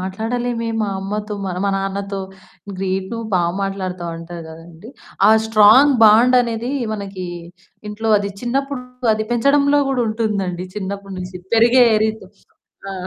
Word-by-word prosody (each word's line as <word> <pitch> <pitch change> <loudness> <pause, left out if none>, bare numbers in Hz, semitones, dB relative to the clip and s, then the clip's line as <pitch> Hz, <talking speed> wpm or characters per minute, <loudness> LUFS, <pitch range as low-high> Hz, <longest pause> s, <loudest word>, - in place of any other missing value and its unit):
మాట్లాడలేమే, 230 +5 -3
మా 210 - -1
అమ్మతో, 210 +2 -4
మన 180 -1 -4
మా 200 - +1
నాన్నతో. 195 0 -3 0.6
గ్రేట్ 190 0 -2
నువ్వు 230 -1 -4
బా 180 - +3 0.2
మాట్లాడుతావంటారు 175 -3 -5
గదండీ! 165 +6 -13 0.4
ఆ - - +7 0.2
స్ట్రాంగ్ 220 +6 +6
బాండనేది, 235 +2 +4 0.2
మనకీ 195 -3 -6 0.6
ఇంట్లో 220 +2 -3
అది 200 0 -4
చిన్నప్పుడు 270 +2 -2 0.3
అది 215 0 -3
పెంచడంలో 280 +4 +3
గూడుంటుందండి, 215 -7 -2
చిన్నప్పటి 195 0 -5
నుంచి. 180 0 -7 0.2
పెరిగే 240 +2 +5 0.2
రీతు. 220 -2 -3 0.6
ఆ! - - -5
210 Hz, 120 wpm, -19 LUFS, 190-235 Hz, 0.6 s, ఆ